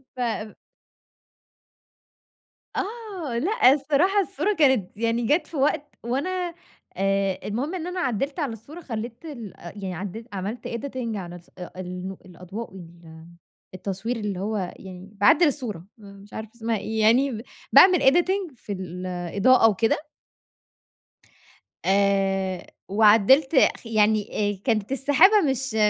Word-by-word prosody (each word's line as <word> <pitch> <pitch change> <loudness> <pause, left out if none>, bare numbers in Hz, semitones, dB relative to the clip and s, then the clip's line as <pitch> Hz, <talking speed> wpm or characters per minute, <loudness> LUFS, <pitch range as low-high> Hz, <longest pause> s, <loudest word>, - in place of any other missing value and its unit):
ف 225 -3 -3 2.2
آه، 390 - -4
لأ، 380 - +4
الصراحة 305 +8 +2
الصورة 395 +2 -1
كانت 255 -9 +2
يعني 230 +1 0
جات 300 +9 +2
في 315 - -7
وقت 290 +1 0
وأنا 345 +8 -2 0.4
آآ، 195 -1 0
المهم 265 - -2
إن 350 -1 -4
أنا 360 0 -4
عدّلت 275 - -2
على 275 -7 -1
الصورة 290 +11 -11
خليت 230 +1 -6
ال 235 - -8
يعني 185 +1 -7
عدت 205 +6 -6
عملت 200 +5 -5
editing 235 -2 -4
على 175 -2 -7
الص 175 -1 -14 0.3
النو 180 +1 -6
الأضواء 185 +4 -9
وال 165 -3 -13 0.5
التصوير 200 +6 -4
اللي 205 -4 -3
هو 210 +2 -2 0.2
يعني 185 0 -11
باعدّل 210 - +5
الصورة. 230 - -3
مش 200 -1 -14
عارفة 220 0 -7
اسمها 225 -1 -1
إيه 220 +2 -3
يعني، 235 +1 +3 0.3
باعمل 365 -2 +8
editing 350 +4 +2
في 210 - -10
الإضاءة 185 +6 +2
وكده. 225 - 0 1.8
آآ، 195 -1 +1 0.2
وعدّلت 225 +8 +5 0.2
خ - - -19
يعني 210 -2 +1
كانت 220 -1 0
السحابة 290 - +5
مش 265 -3 -2
225 Hz, 120 wpm, -24 LUFS, 195-280 Hz, 2.2 s, باعمل